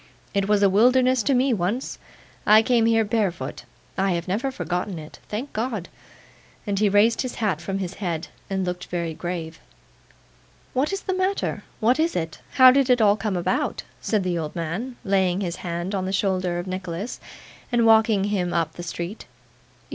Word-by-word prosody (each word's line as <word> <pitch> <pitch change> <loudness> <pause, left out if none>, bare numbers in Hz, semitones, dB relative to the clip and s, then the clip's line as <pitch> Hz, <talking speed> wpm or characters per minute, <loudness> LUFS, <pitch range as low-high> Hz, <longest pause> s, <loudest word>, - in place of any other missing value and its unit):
'It 200 -1 +1
was 205 -1 +3
a - - +7
wilderness 250 +5 +4
to 275 +3 +2
me 255 +1 +3
once. 210 +6 -2 0.4
I 215 +1 +6
came 230 -1 +3
here 225 -1 +3
barefoot. 190 - -2 0.3
I 195 -1 +2
have 170 +1 -3
never 215 +9 0
forgotten 180 -6 -3
it. 155 0 -10
Thank 235 +7 -4
God!' 220 -5 -3 0.8
and 200 -2 -1
he 210 -1 +3
raised 210 +3 +4
his 255 -2 -4
hat 195 -8 -1
from 195 +3 -3
his 190 -2 -4
head, 170 -3 -2 0.2
and 190 -1 -1
looked 180 0 -4
very 170 -2 -3
grave. 165 -1 -5 1.1
'What's 305 +10 0
the 375 - -2
matter? 375 +2 -1 0.2
What 245 +6 +3
is 330 +2 +1
it? 165 -2 -3
How 255 -1 +9
did 270 0 +2
it 250 -1 +5
all 205 -2 +5
come 210 -3 -2
about?' 175 - -1 0.2
said 210 -3 0
the 180 -2 -1
old 155 -2 -5
man, 180 +10 -3
laying 190 -1 +2
his 175 -3 -3
hand 175 +2 -4
on 190 -2 -1
the - - -2
shoulder 185 -3 0
of 175 - -3
Nicholas, 185 +3 -5 0.5
and 235 -1 +3
walking 220 -2 +5
him 185 -4 -1
up 165 -2 0
the 175 - -8
street. 175 +4 -6
195 Hz, 180 wpm, -24 LUFS, 175-230 Hz, 1.1 s, How